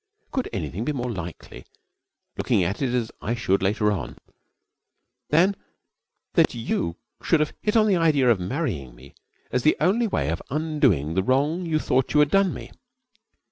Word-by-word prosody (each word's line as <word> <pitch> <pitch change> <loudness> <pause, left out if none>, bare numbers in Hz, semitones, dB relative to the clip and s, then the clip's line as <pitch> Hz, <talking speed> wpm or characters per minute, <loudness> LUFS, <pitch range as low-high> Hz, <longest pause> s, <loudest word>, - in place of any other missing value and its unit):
Could 260 - -2
anything 90 +3 -4
be 150 - -1
more 125 -3 -3
likely, 90 -5 -8 0.7
looking 95 - +1
at 95 +8 -2
it 130 -3 0
as 120 -3 -1
I 115 - -1
should 100 -5 +1
later 105 +2 +1
on, 95 -6 -4 1.1
than 180 +6 +4 0.8
that - - +3
you 85 -7 -2 0.3
should 165 - +2
have 150 0 0
hit 210 +1 +1
on 215 - +5
the 200 -4 +3
idea 145 -7 +4
of 110 - +2
marrying 90 - -3
me 65 +3 -16 0.4
as 125 - +1
the 155 - +3
only 210 +8 +2
way 70 - -1
of 85 - -2
undoing 140 - +1
the 95 - +2
wrong 145 - +1
you 160 -1 +1
thought 130 -2 0
you - - +6
had 150 0 +4
done 195 -2 +4
me? - - -8
125 Hz, 175 wpm, -24 LUFS, 95-155 Hz, 1.1 s, you